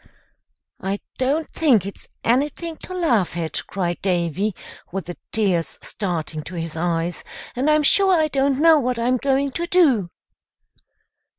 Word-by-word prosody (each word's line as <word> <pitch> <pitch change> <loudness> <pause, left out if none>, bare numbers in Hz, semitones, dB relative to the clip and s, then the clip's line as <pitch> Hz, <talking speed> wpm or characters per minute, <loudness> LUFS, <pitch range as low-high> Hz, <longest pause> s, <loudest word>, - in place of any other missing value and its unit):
"I 195 +1 -2 0.2
don't 285 +5 +1
think 255 - +3
it's 200 - -9 0.2
anything 290 +7 0
to 370 - -8
laugh 235 - +1
at," 160 -2 -2
cried 175 -3 -2
Davy, 180 +2 0 0.4
with 190 +1 -4
the 175 - -6 0.2
tears 190 -7 +1
starting 165 -5 -2
to 180 - -8
his 165 -1 -4
eyes, 170 +1 -1 0.3
"and 265 +5 +1
I'm 305 0 +4
sure 380 +3 +4
I 310 - +3
don't 275 -2 +1
know 320 0 +6
what 250 -2 -1
I'm 245 +2 +1
going 275 +2 +1
to 340 +5 -3
do." 275 - +3
235 Hz, 150 wpm, -22 LUFS, 175-295 Hz, 0.4 s, know